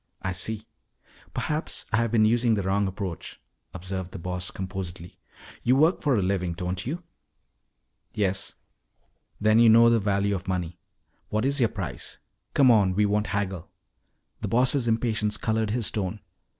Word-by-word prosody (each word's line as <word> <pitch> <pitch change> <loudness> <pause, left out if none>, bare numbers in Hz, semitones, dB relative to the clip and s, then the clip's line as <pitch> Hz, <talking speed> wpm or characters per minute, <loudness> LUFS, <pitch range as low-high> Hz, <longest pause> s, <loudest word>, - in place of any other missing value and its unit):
"I 95 - -1
see. 110 +4 -3 0.7
Perhaps 155 +2 -2
I - - +4
have 115 -1 +1
been 110 -2 +4
using 115 +1 +3
the 100 - -1
wrong 100 +1 +1
approach," 95 -3 -6 0.3
observed 95 0 -5
the - - -5
Boss 90 +1 -3
composedly. 90 -2 -7 0.4
"You 125 +2 +3
work 160 +6 +3
for 140 -4 +2
a 100 - +1
living, 90 -2 0
don't 90 +4 -4
you?" 170 +6 -4 1.1
"Yes." 95 -4 -1 0.8
"Then 110 +1 +4
you 115 -1 +7
know 115 +1 +7
the 115 - +4
value 100 0 +1
of 95 -1 -4
money. 90 -2 -3 0.5
What 110 +3 0
is 140 +1 +1
your 115 -3 +3
price? 95 -7 -6 0.4
Come 135 -3 +6
on, 100 -5 +4
we 105 +1 +3
won't 105 +1 +1
haggle." 95 -4 -3 0.7
The - - -3
Boss' 125 +1 +2
impatience 110 -2 +1
colored 110 -1 0
his 115 -2 0
tone. 105 -1 -3
105 Hz, 160 wpm, -26 LUFS, 95-115 Hz, 1.1 s, you